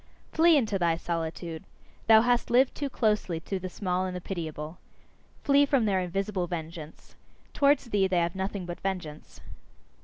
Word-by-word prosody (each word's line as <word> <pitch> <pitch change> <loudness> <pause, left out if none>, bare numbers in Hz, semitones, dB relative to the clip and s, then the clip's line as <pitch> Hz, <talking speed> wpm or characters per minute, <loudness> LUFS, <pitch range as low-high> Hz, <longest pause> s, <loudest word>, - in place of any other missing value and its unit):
Flee 330 0 +5
into 215 -7 0
thy 170 -2 +2
solitude! 165 0 -4 0.4
Thou 220 -1 +8
hast 245 +1 +1
lived 255 +2 +4
too 285 -1 -3
closely 210 -8 0
to 195 +3 -4
the 185 0 -5
small 185 0 -2
and 180 - -5
the - - -3
pitiable. 160 -3 -6 0.6
Flee 280 0 +5
from 275 -5 +2
their 195 -3 +1
invisible 190 +1 -2
vengeance! 160 -2 -8 0.4
Towards 280 -4 +2
thee 195 -2 +3
they 185 -1 0
have 170 0 +1
nothing 190 0 -4
but 175 0 -6
vengeance. 180 -6 -6
185 Hz, 160 wpm, -28 LUFS, 170-220 Hz, 0.6 s, Thou